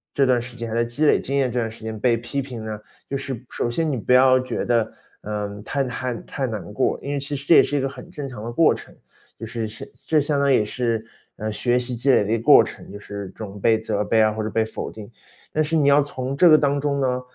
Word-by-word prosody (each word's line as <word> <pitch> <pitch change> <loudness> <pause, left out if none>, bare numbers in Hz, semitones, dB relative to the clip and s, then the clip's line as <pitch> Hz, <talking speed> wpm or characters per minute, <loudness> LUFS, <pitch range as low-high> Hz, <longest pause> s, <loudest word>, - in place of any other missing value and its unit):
这 140 - +4
段 125 -2 +3
时 120 +1 -10
间， 115 -1 -4
还 - - -5
在 115 - +2
积 120 +6 -1
累 - - +5
经 140 - -2
验 130 -3 +1
这 125 - -1
段 115 -1 -1
时 110 0 -13
间 110 -1 -5
被 120 +1 +2
批 120 +4 -3
评 125 -5 -7
呢， 110 -1 -5 0.3
就 140 - -2
是 130 -3 -6
首 - - -1
先 155 +6 0
你 135 - -1
不 120 - +1
要 130 0 +6
觉 130 - -3
得， 115 -2 +1 0.3
嗯， 105 -1 -5
太 140 +4 -1
太 125 -1 -3
太 135 -2 -4
难 105 -4 -6
过， 130 - +1
因 140 - -4
为 140 - -1
其 140 +1 -4
实 140 +1 -7
这 - - +6
也 - - +9
是 145 - -1
一 - - +1
个 135 - 0
很 155 +5 -11
正 150 -6 -6
常 115 -5 -8
的 115 - -4
过 160 +6 +4
程， - - -11 0.4
就 - - -5
是 115 -1 -3
是 110 +1 -10 0.2
这 155 - +4
相 145 0 0
当 140 0 +3
也 110 -5 +3
是， 115 0 -2 0.3
嗯， 110 0 -4
学 120 +3 +1
习 125 0 -1
积 125 +4 +2
累 125 - +4
的 105 - -2
一 115 - +3
个 115 - -7
过 - - +8
程， - - -9
就 100 - -7
是 100 -1 -7
准 105 -1 -9
备、 110 +1 +3
责 105 -2 -1
备 110 +2 +2
啊， 110 0 +4
或 110 +1 -4
者 110 - -2
被 110 +1 +1
否 110 - -6
定。 110 0 -11 0.4
但 155 - +1
是 160 +2 -1
你 150 -3 +3
要 140 +1 +6
从 135 -2 -4
这 175 +5 +6
个 155 - +8
当 140 -1 +1
中 140 -1 0
呢， 125 -2 0
125 Hz, 305 characters per minute, -23 LUFS, 110-140 Hz, 0.4 s, 也